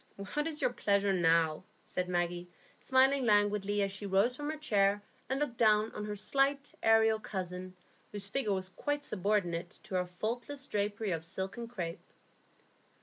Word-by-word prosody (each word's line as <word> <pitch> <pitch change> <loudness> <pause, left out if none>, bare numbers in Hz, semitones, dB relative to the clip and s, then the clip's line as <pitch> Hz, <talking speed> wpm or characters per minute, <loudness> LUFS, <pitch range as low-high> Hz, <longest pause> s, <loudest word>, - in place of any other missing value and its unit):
"What 295 +1 0
is 315 0 -3
your 245 - +2
pleasure 200 -3 +2
now?" 165 -2 +3 0.2
said 180 0 -3
Maggie, 175 0 -1 0.3
smiling 265 +1 +4
languidly 205 -2 +2
as 195 - -1
she 200 +1 -5
rose 200 +6 +3
from 290 +2 -4
her 310 - -3
chair 205 -8 +2 0.3
and 265 +1 0
looked 290 -5 -2
down 215 -1 +4
on 210 - -5
her 210 0 -4
slight, 275 +6 +1
aerial 225 0 +4
cousin, 185 -2 -5 0.4
whose 205 -1 -4
figure 215 0 -1
was 185 -1 -2
quite 290 +9 -2
subordinate 185 -5 -1
to - - -10
her 180 -1 +1
faultless 240 +9 -4
drapery 205 -1 -1
of 165 -2 -2
silk 190 +3 -4
and 235 -1 -5
crape. 175 -8 -5
205 Hz, 165 wpm, -32 LUFS, 185-240 Hz, 0.4 s, smiling